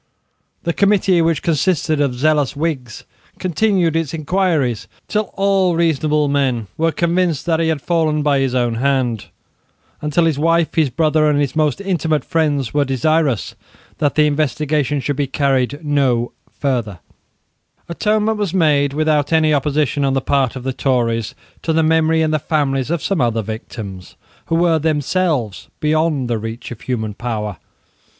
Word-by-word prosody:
The 170 - -1
committee, 195 -3 +3
which 165 -1 0
consisted 155 -2 +1
of 135 -4 0
zealous 145 +1 +1
Whigs, 140 -7 -3 0.3
continued 185 -2 +1
its 165 -1 -1
inquiries 155 - 0 0.2
till 210 -2 -1
all 195 -3 +2
reasonable 155 -2 +1
men 135 -5 0
were 165 +1 +1
convinced 170 -2 0
that 165 -2 +1
he 165 - +1
had 155 -4 -1
fallen 155 -3 +1
by 145 -2 +2
his 135 -2 0
own 120 -2 +1
hand, 130 -5 0 0.7
and 150 - -3
till 170 +3 +3
his 155 -4 0
wife, 165 +1 +2
his 155 -4 +2
brother, 155 +2 +2
and 145 -1 +2
his 140 -1 -1
most 155 -1 +1
intimate 170 -6 -1
friends 150 -7 0
were 145 -1 +3
desirous 140 - 0 0.5
that 145 -2 +1
the 150 - +4
investigation 150 -1 0
should 145 +1 -2
be 145 -2 0
carried 140 +2 0
no 130 -5 +1 0.2
further, 120 -8 -2 0.9
Atonement 210 +4 0
was 195 -3 -2
made, 145 -5 +2
without 150 -1 +1
any 155 -1 +3
opposition 145 0 0
on 135 -1 +1
the - - +2
part 135 -2 0
of 130 - -7
the 130 0 -2
Tories, 115 -4 0 0.3
to 165 - -1
the 160 0 +2
memory 160 0 +3
and 155 0 0
the 155 - +2
families 140 -3 -1
of 170 -2 -1
some 195 -7 0
other 115 -2 0
victims, 105 -3 -8 0.3
who 165 - 0
were 165 -1 +3
themselves 150 - -1
beyond 155 -3 +1
the 115 -2 -1
reach 115 +3 -7
of 120 - -8
human 110 -4 -3
power. 105 -4 -4
150 Hz, 160 wpm, -18 LUFS, 130-165 Hz, 0.9 s, the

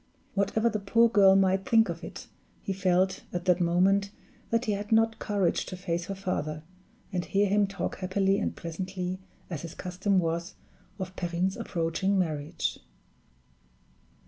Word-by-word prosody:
Whatever 215 +3 +1
the 215 -2 0
poor 230 +4 +4
girl 195 -4 +6
might 190 0 +2
think 225 -1 +5
of - - -5
it, - - -8 0.4
he 195 - -2
felt, 185 0 +1
at 175 0 -4
that 180 -1 +3
moment, 190 +4 +3 0.4
that 230 +2 +1
he 215 - 0
had 205 +1 -3
not 225 0 +3
courage 200 -5 +1
to 185 - -6
face 175 -2 -2
her 195 - -4
father, 155 -5 -3 0.5
and 180 -1 0
hear 200 +3 +2
him 205 +1 +3
talk 200 +1 -4
happily 195 +1 +1
and - - -2
pleasantly, 185 +2 -4 0.3
as 160 - -3
his 170 - -8
custom 185 +2 -1
was, 170 +1 -1 0.4
of 185 -2 -6
Perrine's 175 +2 -1
approaching 175 +3 -1
marriage. 155 -2 -1
190 Hz, 155 wpm, -28 LUFS, 175-200 Hz, 0.5 s, girl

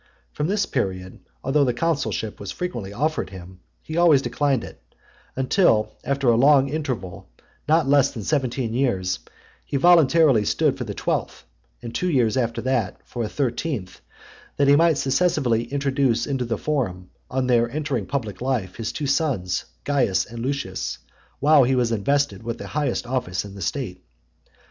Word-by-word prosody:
From 150 - -1
this 200 +1 +1
period, 95 -7 -3 0.2
although 140 +2 +2
the 125 -3 0
consulship 140 -8 -1
was 100 - -7
frequently 120 - -4
offered 150 +9 -1
him, 95 -1 -11 0.2
he 155 - -5
always 160 -6 +5
declined 140 -5 0
it, - - -11 0.5
until, 130 - +2
after 140 -1 -1
a 115 - +5
long 135 +2 +5
interval, 130 - -4 0.4
not 155 -1 +3
less 140 -1 +4
than 115 -5 -7
seventeen 130 -3 -1
years, 95 - 0 0.4
he 140 - -2
voluntarily 160 -6 +5
stood 150 +5 +1
for 130 -3 -5
the 105 -2 -6
twelfth, - - -2 0.4
and 115 -1 -6
two 180 +10 -1
years 120 -8 +2
after 115 -2 -1
that, 125 -7 -1
for 120 - -5
a 105 - -3
thirteenth; 125 - -3 0.6
that 140 - +3
he 140 - +7
might 165 0 +4
successively 135 -6 +1
introduce 135 -4 0
into 135 -3 -2
the 115 -2 -2
forum, 100 -13 -2 0.2
on 130 0 -1
their 120 -2 +3
entering 140 -6 -2
public 115 -8 -4
life, 120 -8 -2
his 115 -2 -3
two 150 - -4
sons, 135 - 0 0.2
Caius 120 -10 +1
and 115 0 -9
Lucius, 130 - -3 0.4
while 145 0 +6
he 130 +2 +2
was 120 -2 +1
invested 115 -1 0
with 115 0 -4
the - - -8
highest 145 -4 -1
office 120 -8 -2
in 100 - -9
the 100 - -9
state. 95 -1 -4
130 Hz, 165 wpm, -23 LUFS, 110-145 Hz, 0.6 s, he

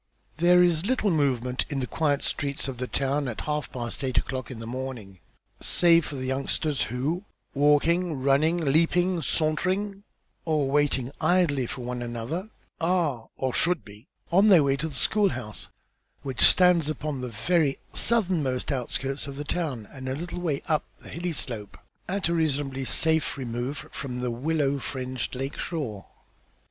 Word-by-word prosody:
There 180 +2 +6
is 175 +1 +2
little 235 -5 +2
movement 130 -5 +1
in 140 - -2
the 130 - -1
quiet 145 +1 0
streets 140 -1 -2
of 130 -3 -5
the 125 - -2
town 140 +2 0
at 120 - -4
half 150 -4 -2
past 120 +2 -5
eight 130 -1 -1
o'clock 130 -1 -1
in 130 - -7
the 115 - -7
morning, 120 -6 -6 0.4
save 170 -2 +4
for 145 - -6
the 130 -1 -4
youngsters 140 +2 -1
who, 145 - -2 0.3
walking, 150 +3 +3
running, 140 +5 +3
leaping, 170 +3 +2
sauntering 185 +7 0 0.4
or 150 -4 +1
waiting 140 -3 +1
idly, 155 -8 +2
one 125 0 -4
for - - -4
another, 120 - -4 0.3
are, 165 -9 0
or 130 -1 -1
should 175 -1 +2
be, 105 +5 -14 0.2
on 195 +5 +5
their 175 -7 +7
way 135 -1 +2
to 145 +4 -3
the 150 - -7
school 200 +9 +3
house 105 - -6 0.6
which 135 -2 -3
stands 180 -4 +6
upon 150 -2 -3
the 125 - -4
very 150 +4 +1 0.2
southernmost 175 - +1
outskirts 135 +2 -2
of 140 - -6
the 145 - -4
town, 145 - -3
and 130 -1 -6
a 130 - -1
little 175 +4 -5
way 155 -6 -1
up 155 -2 +2 0.2
the - - -12
hilly 175 +1 -3
slope, 115 -9 -5 0.3
at 190 -1 0
a 170 - 0
reasonably 140 -4 0
safe 160 +3 +1
remove 125 +2 -3
from 125 -3 -5
the 125 -1 -1
willow 140 +2 0
fringed 130 -2 -4
lake 135 +2 -4
shore. 125 - -4
140 Hz, 165 wpm, -26 LUFS, 130-165 Hz, 0.6 s, their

